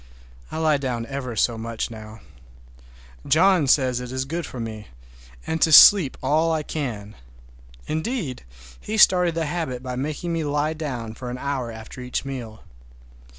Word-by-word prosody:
I - - -5
lie 155 -2 +2
down 125 -4 -3
ever 130 -3 -5
so 115 +1 +1
much 115 +1 -4
now. 110 -1 -10 1.1
John 180 -2 +4
says 130 -2 +3
it 125 0 -7
is 130 0 -2
good 165 +3 -4
for 125 - -8
me, 110 -3 -6 0.6
and 160 0 -3
to 160 - +4
sleep 170 -1 +8
all 160 +3 +2
I 160 -1 -1
can. 115 -10 -5 0.7
Indeed, 160 - -3 0.4
he 220 - -4
started 180 -4 +5
the 165 -1 -1
habit 145 -6 -4
by 125 -1 -5
making 155 +6 -3
me 165 -1 -1
lie 150 +1 0
down 125 -8 -5
for 125 +2 -7
an 125 - -5
hour 130 -3 -3
after 110 +3 -10
each 125 +2 -4
meal. 120 -5 -7
135 Hz, 160 wpm, -23 LUFS, 120-160 Hz, 1.1 s, sleep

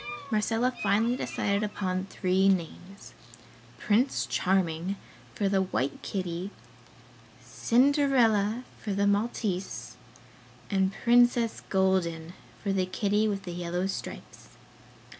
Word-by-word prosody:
Marcella 225 +3 +1
finally 215 +4 +2
decided 200 -5 -1
upon 190 -3 -2
three 190 0 +2
names; 190 +2 -3 0.6
Prince 225 +6 +1
Charming 180 0 0 0.4
for 200 - 0
the 195 -1 +2
white 140 -7 -2
kitty, 185 -1 -4 1.0
Cinderella 245 -4 +2 0.2
for 210 - -3
the 200 +1 +1
Maltese 200 -2 -1 0.7
and 190 -1 +2
Princess 240 -1 +4
Golden 180 -4 +1 0.3
for 200 -1 0
the 185 -1 0
kitty 205 +3 +1
with 200 -2 -2
the 175 -2 -6
yellow 175 +1 -2
stripes. 195 - -7
195 Hz, 105 wpm, -28 LUFS, 185-220 Hz, 1.0 s, Princess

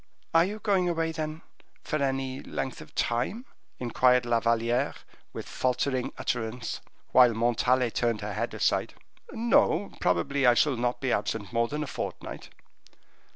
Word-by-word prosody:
"Are 165 0 +6
you 205 +3 -4
going 195 -5 +1
away, 165 -1 0
then, 155 0 -5 0.4
for 155 -2 -2
any 135 -1 -1
length 130 - -4
of - - -14
time?" 130 - -1 0.3
inquired 125 +1 +3
La 120 -1 +2
Valliere, 115 +3 +1 0.4
with - - -7
faltering 130 0 -1
utterance, 115 0 -3 0.3
while 125 -3 +6
Montalais 120 +2 +2
turned 115 -3 0
her 105 0 -4
head - - -3
aside. - - 0 0.4
"No; 220 -5 +2
probably 125 +10 +2
I 120 - +6
shall 145 +2 +3
not 120 +1 -1
be 130 -2 0
absent 110 -2 -2
more 115 0 +2
than 150 +4 -3
a - - -6
fortnight." - - -6
125 Hz, 150 wpm, -28 LUFS, 120-155 Hz, 0.4 s, Are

